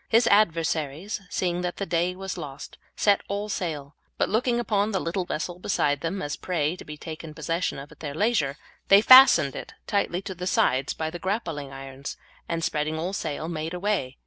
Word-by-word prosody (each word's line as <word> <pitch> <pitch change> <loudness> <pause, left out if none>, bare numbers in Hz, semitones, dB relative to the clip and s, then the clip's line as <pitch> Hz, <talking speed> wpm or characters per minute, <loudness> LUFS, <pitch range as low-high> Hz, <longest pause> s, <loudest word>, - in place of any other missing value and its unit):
His 230 +1 +5
adversaries, 165 -3 +1
seeing 175 -1 -1
that 180 -1 -3
the 200 - -2
day 175 +1 0
was 190 0 -5
lost, 145 -5 -8 0.2
set 200 -1 +3
all 205 +1 -3
sail, 155 -7 -4 0.2
but - - +1
looking 240 +2 +1
upon 210 -3 +1
the 190 - 0
little 180 +2 -2
vessel 175 +1 -4
beside 145 -7 0
them 185 +4 -2
as 145 - -3
a - - -6
prey 165 -3 -1
to - - -9
be 150 0 -9
taken 155 0 -8
possession 165 +3 -1
of 140 +1 -9
at - - -16
their 145 -2 -5
leisure, 165 -8 +1 0.3
they 195 +1 +7
fastened 255 - +8
it - - -8
tightly 195 -2 0
to 190 - -5
their 180 0 -5
sides 130 -6 +2
by 160 0 -3
the 175 - -6
grappling 170 -8 -3
irons, 135 0 -7 0.3
and 165 -1 -1
spreading 155 0 -1
all 175 +4 -3
sail, 155 -4 -3
made 165 0 -4
away. 180 -9 -1
170 Hz, 200 wpm, -26 LUFS, 150-195 Hz, 0.3 s, fastened